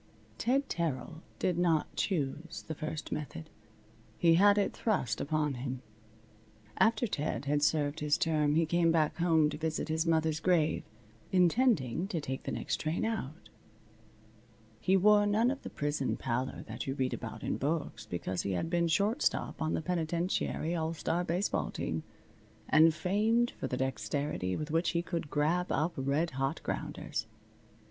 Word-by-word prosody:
Ted 270 +4 +1
Terrill 160 0 -3 0.2
did 180 -2 0
not 165 -3 +1
choose 165 -2 -2
the 160 - -3
first 155 0 -5
method. 155 +1 -5 0.7
He 170 -1 +5
had 200 +4 +6
it 200 - +1
thrust 130 - 0
upon 150 -1 0
him. 130 0 -5 1.0
After 225 +1 +4
Ted 145 - -2
had 145 +1 +1
served 150 0 +1
his 150 -1 +2
term 150 -2 +2
he 165 +1 +4
came 170 +1 +3
back 160 -2 +2
home 165 -3 +4
to 150 - -6
visit 160 0 -2
his 160 +1 0
mother's 160 -1 +2
grave, 165 -3 +2 0.5
intending 180 - +3
to 175 -5 -2
take 135 -3 -4
the - - -2
next - - -2
train 155 +6 -1
out. 190 -8 -4 1.3
He 190 +1 +3
wore 205 +2 +5
none 220 +5 +3
of 275 - -5
the - - -7
prison 145 -2 -1
pallor 130 +1 -2
that - - -6
you 135 - -1
read 130 -2 0
about 110 -1 -6
in - - -1
books, 145 -6 -2
because 90 0 -2
he 100 - -2
had 165 - -2
been 170 -1 +2
shortstop 205 - +1
on 160 0 0
the - - -2
penitentiary 170 -1 -1
all 165 -1 -1
star 170 +3 -1
baseball 175 +4 0
team, 80 0 -3 0.7
and 160 +1 +6
famed 215 +8 +1
for - - -5
the 125 - -2
dexterity 130 -6 -2
with 150 0 -4
which 165 +2 +2
he 170 - 0
could 170 -4 -3
grab 165 +5 +1
up 160 +3 +1
red 140 +5 0
hot 135 +4 -1
grounders. 110 - -3
160 Hz, 160 wpm, -31 LUFS, 145-175 Hz, 1.3 s, had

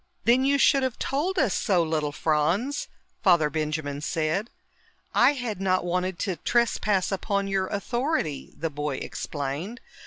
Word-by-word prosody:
"Then 245 +3 +5
you 280 +1 +3
should 275 0 +5
have 260 -2 -1
told 335 +8 -1
us 260 - +2
so, 180 -4 +2
little 155 -2 -1
Franz," 165 - 0 0.3
Father 170 -5 +4
Benjamin 155 -2 -2
said. 165 +8 -1 0.6
"I 250 +4 +5
had 240 -8 -4
not 185 -2 +1
wanted 180 +1 -1
to 190 -4 -1
trespass 215 -5 +1
upon 200 0 -1
your 195 -1 0
authority," 220 - -2
the 165 0 -2
boy 145 -1 -3
explained. 145 - -4
190 Hz, 145 wpm, -26 LUFS, 155-240 Hz, 0.6 s, Then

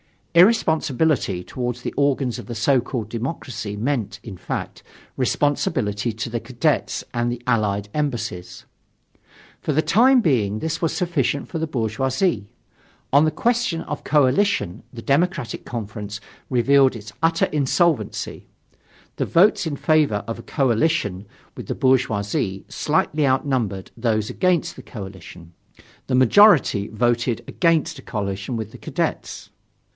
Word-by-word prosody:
Irresponsibility 160 - +3
towards 125 +2 -4
the - - -4
organs 135 -4 +1
of - - -9
the 120 - -5
so 130 +4 +3
called 120 -3 -4
democracy 115 -4 -4
meant, 110 -2 -2
in 100 -6 -8
fact, - - -5 0.4
responsibility 125 -5 0
to 115 +2 -4
the 120 0 -2
Cadets 120 +1 -1
and 120 0 0
the 120 0 -4
Allied 105 -4 0
Embassies. 115 -11 -3 0.9
For 155 - -2
the 155 - +3
time 250 +9 +5
being 110 - +1
this 160 +7 -3
was 165 - 0
sufficient 150 -6 -1
for 165 - -4
the 160 - -1
bourgeoisie. 125 - -1 0.7
On 145 +2 +6
the - - +3
question 230 -4 0
of 150 - -6
coalition 140 - +2
the 115 - -8
Democratic 150 -2 0
Conference 105 -3 -6 0.3
revealed 135 +1 +4
its 105 -1 -9
utter 165 0 +3
insolvency: 150 - 0 0.7
the - - 0
votes 180 0 +3
in 150 - -2
favor 150 -9 +2
of 115 - -4
a - - -9
coalition 115 - 0 0.3
with - - -7
the - - -2
bourgeoisie 105 -6 0
slightly 150 -2 0
outnumbered 130 -8 -1
those 110 -2 0
against 180 -3 0
the - - -8
coalition; 95 - -10 0.5
the 130 - +1
majority 130 - +5
voted 120 +1 0
against 165 -4 +1
a - - -10
coalition 100 0 -4
with 110 -1 -5
the - - -12
Cadets. - - -3
125 Hz, 135 wpm, -22 LUFS, 110-150 Hz, 0.9 s, On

